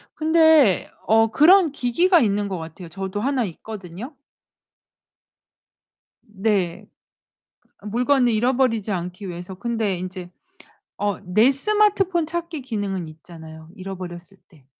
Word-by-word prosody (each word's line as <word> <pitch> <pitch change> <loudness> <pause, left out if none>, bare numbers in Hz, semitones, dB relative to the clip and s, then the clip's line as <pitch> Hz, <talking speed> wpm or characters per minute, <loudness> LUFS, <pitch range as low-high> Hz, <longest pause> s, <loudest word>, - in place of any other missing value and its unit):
근데 315 - +4 0.2
어 225 +1 +4
그런 330 - +5
기기가 335 +8 +2
있는 205 -4 +1
것 190 -2 -4
같아요. 165 +2 -9
저도 190 +3 -5
하나 265 +1 0
있거든요. 200 - -9 2.2
네. 195 -4 -1 0.9
아 - - -19
물건을 245 +3 +2
잃어버리지 230 -2 +1
않기 180 +1 -5
위해서. 175 +2 -8
근데 220 -1 -2
인제 180 0 -7 0.7
어 205 -2 -1
내 215 +8 +4
스마트폰 390 +1 +1
찾기 335 -1 -4
기능은 200 -8 -4
있잖아요, 160 0 -13
잃어버렸을 185 -1 -8
때. 150 -7 -23
210 Hz, 250 characters per minute, -22 LUFS, 180-270 Hz, 2.2 s, 그런